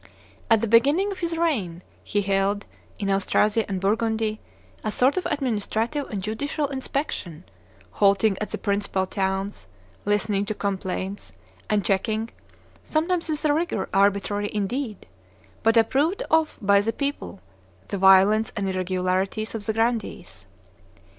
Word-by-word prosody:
At 225 Hz, -2 st, +5 dB
the 230 Hz, -, 0 dB
beginning 285 Hz, -, +4 dB
of 390 Hz, -, -6 dB
his 335 Hz, -1 st, -2 dB
reign 205 Hz, -, -1 dB, 0.2 s
he 205 Hz, 0 st, -1 dB
held, 195 Hz, +1 st, 0 dB, 0.3 s
in 200 Hz, -, -3 dB
Austrasia 210 Hz, +3 st, +2 dB
and 190 Hz, -1 st, -2 dB
Burgundy, 220 Hz, +2 st, 0 dB, 0.4 s
a 215 Hz, -, -1 dB
sort 255 Hz, +6 st, +3 dB
of 370 Hz, -, -1 dB
administrative 250 Hz, 0 st, -1 dB
and 200 Hz, -4 st, -4 dB
judicial 285 Hz, +8 st, -2 dB
inspection, 265 Hz, -, -4 dB, 0.5 s
halting 200 Hz, 0 st, +3 dB
at 215 Hz, -, -2 dB
the -, -, -4 dB
principal 200 Hz, -2 st, -1 dB
towns, 190 Hz, +1 st, -3 dB, 0.4 s
listening 205 Hz, -1 st, 0 dB
to 215 Hz, -, -2 dB
complaints, 195 Hz, 0 st, -4 dB, 0.4 s
and 205 Hz, -3 st, +1 dB
checking, 220 Hz, +4 st, 0 dB, 0.5 s
sometimes 335 Hz, +2 st, 0 dB
with 305 Hz, 0 st, -2 dB
a 295 Hz, -, +4 dB
rigor 310 Hz, -, -1 dB
arbitrary 200 Hz, +1 st, +2 dB
indeed, 215 Hz, +2 st, -3 dB, 0.6 s
but 225 Hz, +1 st, +3 dB
approved 290 Hz, -, +2 dB
of 320 Hz, -1 st, +2 dB
by 200 Hz, 0 st, +4 dB
the 225 Hz, +2 st, -1 dB
people, 280 Hz, -, -4 dB, 0.5 s
the 200 Hz, -, -3 dB
violence 195 Hz, +3 st, +5 dB
and 200 Hz, -2 st, -1 dB
irregularities 185 Hz, +3 st, -1 dB
of 225 Hz, -2 st, -6 dB
the 220 Hz, -, +1 dB
grandees. 225 Hz, +1 st, -2 dB
215 Hz, 135 wpm, -24 LUFS, 195-250 Hz, 0.6 s, At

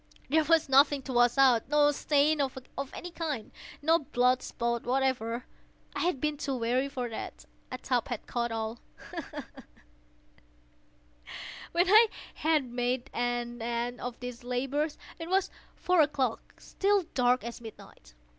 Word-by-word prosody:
There 315 Hz, +3 st, +4 dB
was 325 Hz, +1 st, +3 dB
nothing 275 Hz, +1 st, +5 dB
to 260 Hz, -, -5 dB
wash 240 Hz, +1 st, +4 dB
out—no 270 Hz, +3 st, +5 dB
stain 295 Hz, +1 st, +2 dB
of 265 Hz, -1 st, -2 dB, 0.3 s
any 355 Hz, -, -7 dB
kind—no 320 Hz, +1 st, -2 dB
blood 250 Hz, -3 st, +2 dB
spot 235 Hz, 0 st, -2 dB
whatever. 250 Hz, -2 st, 0 dB, 0.5 s
I -, -, -2 dB
had 345 Hz, -5 st, 0 dB
been 300 Hz, +1 st, -1 dB
too 280 Hz, -2 st, -2 dB
wary 250 Hz, +3 st, 0 dB
for 255 Hz, -3 st, -3 dB
that. 225 Hz, -, -7 dB, 0.3 s
A 255 Hz, -, -3 dB
tub 250 Hz, -2 st, -1 dB
had 240 Hz, -4 st, -5 dB
caught 235 Hz, -1 st, -2 dB
all—ha! 225 Hz, +1 st, -6 dB
ha! -, -, -7 dB, 2.3 s
When 350 Hz, +2 st, +3 dB
I 435 Hz, +4 st, +8 dB, 0.3 s
had 310 Hz, -2 st, +2 dB
made 245 Hz, +2 st, -2 dB
an 240 Hz, 0 st, -2 dB
end 235 Hz, +1 st, -2 dB
of 245 Hz, -1 st, -5 dB
these 245 Hz, -1 st, -7 dB
labors, 270 Hz, +5 st, -1 dB, 0.2 s
it 330 Hz, 0 st, -6 dB
was 380 Hz, 0 st, +2 dB, 0.2 s
four 360 Hz, -2 st, +3 dB
o'clock—still 300 Hz, -, 0 dB
dark 250 Hz, 0 st, +3 dB
as 235 Hz, +1 st, -7 dB
midnight. -, -, -13 dB
255 Hz, 135 wpm, -30 LUFS, 240-300 Hz, 2.3 s, I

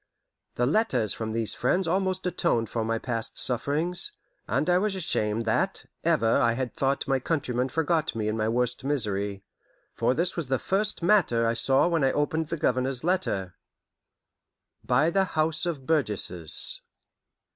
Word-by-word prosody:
The 120 Hz, -, +1 dB
letters 145 Hz, -, +2 dB
from 110 Hz, -1 st, -4 dB
these 115 Hz, -1 st, +1 dB
friends 180 Hz, +9 st, 0 dB
almost 185 Hz, +1 st, -1 dB
atoned 115 Hz, -10 st, 0 dB
for 115 Hz, -, -1 dB
my 115 Hz, +1 st, -1 dB
past 115 Hz, -1 st, -3 dB
sufferings, 160 Hz, -, 0 dB, 0.3 s
and -, -, 0 dB
I 180 Hz, 0 st, +4 dB
was 205 Hz, 0 st, -1 dB
ashamed 115 Hz, -, -1 dB
that 110 Hz, -, 0 dB, 0.2 s
ever 115 Hz, +1 st, +2 dB
I 115 Hz, -1 st, +3 dB
had 125 Hz, 0 st, -3 dB
thought 135 Hz, +1 st, -1 dB
my 135 Hz, -1 st, +1 dB
countrymen 130 Hz, -3 st, -1 dB
forgot 160 Hz, -1 st, 0 dB
me 110 Hz, -2 st, -2 dB
in 110 Hz, -, -1 dB
my 110 Hz, 0 st, 0 dB
worst 125 Hz, +1 st, -1 dB
misery; 105 Hz, -8 st, -1 dB, 0.5 s
for 125 Hz, -, 0 dB
this 175 Hz, +2 st, 0 dB
was 170 Hz, -6 st, -3 dB
the 130 Hz, 0 st, +1 dB
first 200 Hz, -, -1 dB
matter 170 Hz, -, +3 dB
I 115 Hz, -, +2 dB
saw 135 Hz, +6 st, +3 dB
when 165 Hz, -4 st, +1 dB
I 135 Hz, -, +3 dB
opened 155 Hz, +2 st, -1 dB
the 165 Hz, -, -3 dB
Governor's 130 Hz, -2 st, 0 dB
letter: 160 Hz, -, 0 dB, 1.3 s
By 135 Hz, +7 st, +2 dB
the 195 Hz, +2 st, +2 dB
House 155 Hz, +2 st, +1 dB
of 145 Hz, -6 st, -4 dB
Burgesses. 105 Hz, -, +1 dB
135 Hz, 160 wpm, -26 LUFS, 115-170 Hz, 1.3 s, I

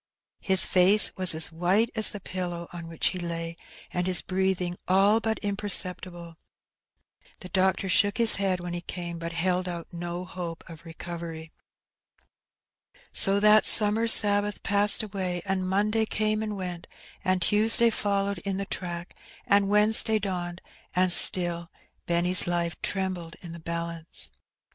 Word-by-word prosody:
His 190 Hz, -1 st, +3 dB
face 190 Hz, +3 st, +4 dB
was 185 Hz, -4 st, +2 dB
as 160 Hz, +2 st, 0 dB
white 185 Hz, +8 st, +1 dB
as 220 Hz, -2 st, +5 dB
the 205 Hz, -, -6 dB
pillow 175 Hz, -2 st, -5 dB
on 170 Hz, -1 st, -8 dB
which 165 Hz, -1 st, 0 dB
he 185 Hz, -, -5 dB
lay, 165 Hz, -1 st, -5 dB, 0.4 s
and 180 Hz, 0 st, -2 dB
his 180 Hz, -5 st, +3 dB
breathing 185 Hz, -2 st, -1 dB
all 195 Hz, +4 st, +4 dB
but 220 Hz, -1 st, -2 dB
imperceptible. 185 Hz, -4 st, -1 dB, 1.0 s
The 185 Hz, -, -9 dB
doctor 190 Hz, 0 st, +1 dB
shook 205 Hz, +2 st, +2 dB
his 230 Hz, -1 st, +4 dB
head 190 Hz, -2 st, 0 dB
when 175 Hz, 0 st, -6 dB
he 175 Hz, -, -4 dB
came, 175 Hz, -1 st, -7 dB
but 170 Hz, 0 st, -5 dB
held 180 Hz, +1 st, 0 dB
out 170 Hz, -1 st, -7 dB
no 175 Hz, +1 st, -5 dB
hope 175 Hz, -2 st, -7 dB
of 165 Hz, 0 st, -13 dB
recovery. 165 Hz, -1 st, -8 dB, 1.6 s
So 195 Hz, +1 st, +2 dB
that 210 Hz, 0 st, +5 dB
summer 220 Hz, +1 st, +4 dB
Sabbath 205 Hz, -2 st, +2 dB
passed 205 Hz, +1 st, +2 dB
away, 185 Hz, -4 st, -4 dB
and 190 Hz, -1 st, -2 dB
Monday 215 Hz, +3 st, +1 dB
came 215 Hz, 0 st, -1 dB
and 210 Hz, -2 st, -4 dB
went, 180 Hz, -2 st, -6 dB, 0.4 s
and 185 Hz, -1 st, +1 dB
Tuesday 225 Hz, +5 st, +3 dB
followed 200 Hz, -2 st, -1 dB
in 195 Hz, +2 st, -4 dB
the 200 Hz, -, -3 dB
track, 175 Hz, -2 st, -6 dB, 0.3 s
and 200 Hz, -1 st, +2 dB
Wednesday 215 Hz, +1 st, +4 dB
dawned, 180 Hz, -3 st, -5 dB, 0.3 s
and 185 Hz, 0 st, +2 dB
still 175 Hz, -1 st, +3 dB, 0.4 s
Benny's 175 Hz, +2 st, +2 dB
life 170 Hz, -1 st, -1 dB
trembled 185 Hz, -4 st, -3 dB
in 170 Hz, -, -8 dB
the 170 Hz, -, -9 dB
balance. 170 Hz, 0 st, -4 dB
185 Hz, 150 wpm, -26 LUFS, 170-205 Hz, 1.6 s, as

